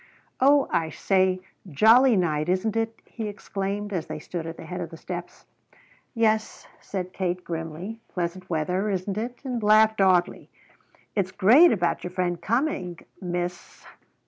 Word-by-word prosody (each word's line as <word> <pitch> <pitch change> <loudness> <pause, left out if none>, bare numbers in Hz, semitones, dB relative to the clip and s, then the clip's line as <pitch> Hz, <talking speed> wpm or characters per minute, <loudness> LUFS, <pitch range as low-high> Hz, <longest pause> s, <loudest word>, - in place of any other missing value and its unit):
"Oh, 280 +2 +5
I 160 -1 +1
say, 185 +2 +1 0.3
jolly 225 - +6
night, 155 -4 0
isn't 190 +4 0
it?" 225 0 -2
he 225 -2 -6
exclaimed 200 0 -4
as 170 -4 -2
they 155 - -5
stood 165 +1 -6
at 165 - -7
the - - -9
head 180 0 -5
of 170 - -5
the 165 - -10
steps. 175 +1 -7 0.7
"Yes," 220 -1 0
said 185 -2 -5
Kate 180 -1 -2
grimly, 165 +6 -5
"pleasant 180 +1 -4
weather, 180 +5 0
isn't 195 +1 -2
it?" 240 +2 -4
and 250 -3 -2
laughed 215 0 +5
oddly. 185 -2 +2 0.7
"It's 190 -3 0
great 250 - +6
about 175 -5 0
your 180 - -4
friend 175 -1 -2
coming; 215 - -1 0.2
Miss 175 -1 -5
185 Hz, 150 wpm, -25 LUFS, 175-220 Hz, 0.7 s, jolly